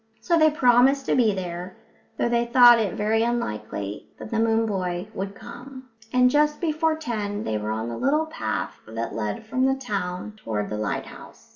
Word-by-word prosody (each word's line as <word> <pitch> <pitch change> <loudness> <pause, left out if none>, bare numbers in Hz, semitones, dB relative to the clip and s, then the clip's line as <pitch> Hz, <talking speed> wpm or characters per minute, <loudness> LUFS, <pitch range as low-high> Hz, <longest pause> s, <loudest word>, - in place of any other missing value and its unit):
So 240 +10 +1
they 315 -1 +5
promised 265 -1 +4
to - - +1
be 235 -4 +4
there, 180 0 -6 0.4
though - - +1
they 235 0 +1
thought 240 -1 +7
it 210 -4 -1
very 215 +2 +1
likely 105 - -4
that - - -9
the 225 - 0
moon 225 0 +2
boy 185 -3 -2
wouldn't 195 +1 -5
come; 255 +2 -11 0.2
and 250 0 +5
just 300 +3 +2
before 320 -1 +1
ten 215 -9 -3
they 110 -1 -2
were 105 0 -4
on 110 +1 -2
the 115 -1 -5
little 300 +4 +1
path 315 - -4
that 115 +1 -4
led 105 - -3
from 255 +4 +1
the 265 - +2
town 205 -6 -4
toward 105 - -4
the 105 - -2
lighthouse. 105 -1 -6
225 Hz, 185 wpm, -24 LUFS, 180-260 Hz, 0.4 s, thought